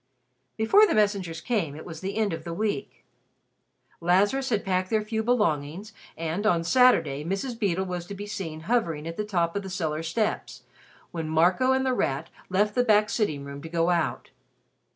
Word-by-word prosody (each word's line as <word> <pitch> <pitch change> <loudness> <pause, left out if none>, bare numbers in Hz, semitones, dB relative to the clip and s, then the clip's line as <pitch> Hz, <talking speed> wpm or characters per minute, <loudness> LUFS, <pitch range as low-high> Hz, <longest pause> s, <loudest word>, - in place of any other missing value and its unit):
Before 395 - +5
the - - 0
messengers 200 -6 +1
came, 180 - -1
it 155 - -9
was 160 -2 -8
the 195 +2 -4
end 210 -5 +1
of 165 -1 -5
the 170 0 -5
week. 215 +2 -3 0.9
Lazarus 205 +10 +2
had 215 -4 0
packed 185 -1 0
their 215 -1 +1
few 220 +1 -2
belongings, 205 -4 0 0.2
and 165 +4 -2
on 170 -5 +2
Saturday 170 - +4
Mrs. 195 - -2
Beedle 190 -3 0
was 180 -2 -5
to 200 - -6
be 205 +1 -6
seen 165 -7 -5
hovering 165 -6 0
at 165 - -5
the 210 - -2
top 175 -5 -1
of 200 - -1
the 195 - -7
cellar 160 -4 -2
steps, 210 +7 -2 0.5
when 165 -2 -4
Marco 180 +11 +3
and 265 0 +2
The 260 - +2
Rat 150 - -1 0.2
left 205 +3 +2
the 245 - +2
back 215 -2 +3
sitting 150 -11 -1
room 140 0 -8
to 160 - -8
go 170 +1 +1
out. 170 -4 -1
185 Hz, 190 wpm, -26 LUFS, 165-215 Hz, 0.9 s, Before